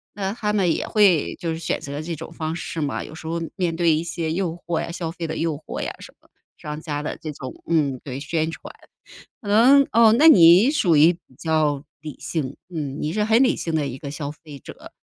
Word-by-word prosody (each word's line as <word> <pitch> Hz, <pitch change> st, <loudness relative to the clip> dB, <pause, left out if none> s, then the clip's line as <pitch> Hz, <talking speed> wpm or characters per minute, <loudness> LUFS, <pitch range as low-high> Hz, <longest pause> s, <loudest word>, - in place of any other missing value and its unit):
那 195 Hz, -1 st, -2 dB
他 210 Hz, -2 st, -2 dB
们 190 Hz, -5 st, +2 dB
也 -, -, -3 dB
会 195 Hz, -8 st, +3 dB
就 170 Hz, -3 st, -2 dB
是 160 Hz, -, -6 dB
选 165 Hz, -, -2 dB
择 140 Hz, +1 st, -6 dB
这 165 Hz, +1 st, -5 dB
种 165 Hz, +2 st, -9 dB
方 160 Hz, 0 st, -4 dB
式 165 Hz, -1 st, -5 dB
嘛， 140 Hz, -2 st, -2 dB
有 -, -, -11 dB
时 160 Hz, 0 st, -9 dB
候， 165 Hz, +1 st, -2 dB, 0.2 s
面 175 Hz, -3 st, -1 dB
对 165 Hz, -1 st, +3 dB
一 160 Hz, -, -2 dB
些 160 Hz, -1 st, -3 dB
诱 175 Hz, -2 st, -2 dB
惑 170 Hz, -1 st, -1 dB
呀， 170 Hz, -, -5 dB
消 165 Hz, -1 st, -4 dB
费 170 Hz, -1 st, -5 dB
的 160 Hz, -, -4 dB
诱 165 Hz, -2 st, -1 dB
惑 150 Hz, -, -7 dB
呀 -, -, -3 dB
什 -, -, -13 dB
么， -, -, -28 dB, 0.3 s
商 150 Hz, +1 st, -7 dB
家 150 Hz, -3 st, -4 dB
的 150 Hz, -, -4 dB
这 155 Hz, -, -5 dB
种， 130 Hz, -2 st, -8 dB, 0.2 s
嗯， 145 Hz, -6 st, +1 dB
对， 135 Hz, -2 st, -6 dB
宣 160 Hz, +2 st, -1 dB
传。 -, -, -9 dB, 0.7 s
可 205 Hz, -, -8 dB
能 265 Hz, +6 st, +6 dB
哦， 225 Hz, -1 st, +6 dB
那 290 Hz, +7 st, +5 dB
你 185 Hz, -, +7 dB
属 180 Hz, -, +2 dB
于 160 Hz, +4 st, +6 dB
比 175 Hz, -, -15 dB, 0.2 s
较 155 Hz, -3 st, 0 dB, 0.2 s
理 150 Hz, -2 st, -8 dB
性？ 145 Hz, -5 st, -4 dB
嗯， 150 Hz, -5 st, -5 dB
你 155 Hz, +2 st, -2 dB
是 210 Hz, -, 0 dB
很 220 Hz, +2 st, +3 dB
理 255 Hz, -, +2 dB
性 165 Hz, -, -4 dB
的 150 Hz, -2 st, 0 dB
一 130 Hz, -, -5 dB
个 140 Hz, +1 st, -7 dB
消 145 Hz, 0 st, -5 dB
费 150 Hz, -1 st, -13 dB
者， -, -, -12 dB
165 Hz, 255 characters per minute, -22 LUFS, 150-180 Hz, 0.7 s, 你